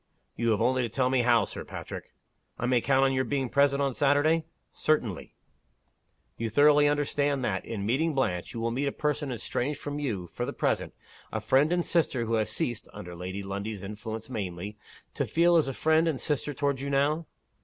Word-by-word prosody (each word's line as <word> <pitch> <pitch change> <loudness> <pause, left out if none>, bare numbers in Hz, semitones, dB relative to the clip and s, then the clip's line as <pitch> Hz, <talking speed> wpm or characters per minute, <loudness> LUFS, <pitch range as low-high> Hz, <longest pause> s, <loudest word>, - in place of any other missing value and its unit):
"You 115 0 0
have 110 -1 +2
only 130 +1 +2
to 120 - -1
tell 130 +3 +1
me 130 -1 +3
how, 120 -2 +4
Sir - - -7
Patrick." - - -8 0.5
"I 125 - -2
may 125 -1 +3
count 135 +2 +3
on 135 - +2
your 130 0 +1
being 130 0 -1
present 140 +1 +3
on 135 -2 0
Saturday?" 145 +4 +3 0.3
"Certainly." 120 - -1 1.0
"You 115 0 -2
thoroughly 145 +4 +5
understand 145 -2 +1
that, 95 -4 -1
in 105 -4 -4
meeting 145 +8 +1
Blanche, 95 -10 -1
you - - -3
will 115 0 -1
meet 135 +4 -1
a - - 0
person 150 -1 -1
estranged 130 +4 -2
from 145 0 -4
you, 110 -11 -2
for - - -5
the - - -3
present - - -1 0.4
a 110 - -1
friend 135 +8 +3
and 175 -1 +1
sister 140 -8 +1
who 115 - -2
has 110 -1 +1
ceased 115 +1 -2
(under 90 0 -8
Lady 95 +3 -5
Lundie's 100 +1 -5
influence 110 +2 -6
mainly) 100 -4 -5 0.4
to - - -1
feel 170 +1 +4
as 160 -4 +4
a - - -1
friend 160 +4 +2
and 150 -5 0
sister 150 0 -1
toward 140 -1 -1
you 140 +1 -3
now?" 145 +3 +1
130 Hz, 200 wpm, -28 LUFS, 110-145 Hz, 1.0 s, thoroughly